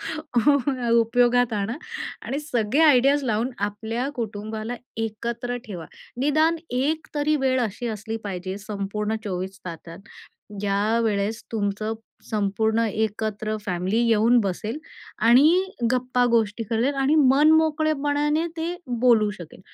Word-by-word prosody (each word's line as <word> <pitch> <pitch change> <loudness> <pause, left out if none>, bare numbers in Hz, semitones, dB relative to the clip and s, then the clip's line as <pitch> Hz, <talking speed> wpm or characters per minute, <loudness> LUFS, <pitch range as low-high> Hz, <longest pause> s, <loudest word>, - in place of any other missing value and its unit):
सगळं 275 -3 0
उपयोगात 240 +1 +3
आणा. 210 +3 -2 0.5
आणि 275 - -3
सगळे 260 -3 0
आयडियाज 280 -1 +5
लावून 230 +2 0
आपल्या 220 +5 -2
कुटुंबाला 220 0 -4 0.2
एकत्र 235 +2 -3
ठेवा. 175 -7 -7 0.3
निदान 310 +4 +3
एक 285 +6 -1
तरी 300 +1 +1
वेळ 260 -1 +2
अशी 235 +2 -3
असली 220 0 -4
पाहिजे 190 -1 -4
संपूर्ण 210 +1 -3
24 190 0 -4
तासात, 165 0 -8 0.6
ज्यावेळेस 210 +1 0
तुमचं 215 0 -1 0.4
संपूर्ण 220 +1 +1
एकत्र 215 0 -2
फॅमिली 185 +4 -1
येऊन 230 +2 +4
बसेल 210 +5 -3 0.5
आणि 305 +10 +6 0.3
गप्पा 250 0 +1
गोष्टी 220 0 +1
करेल 230 +6 0
आणि 275 +2 +2
मनमोकळेपणाने 300 +1 +3
ते 330 +2 -2 0.3
बोलू 230 -4 +4
शकेल. 175 -3 -11
230 Hz, 110 wpm, -24 LUFS, 210-270 Hz, 0.6 s, आणि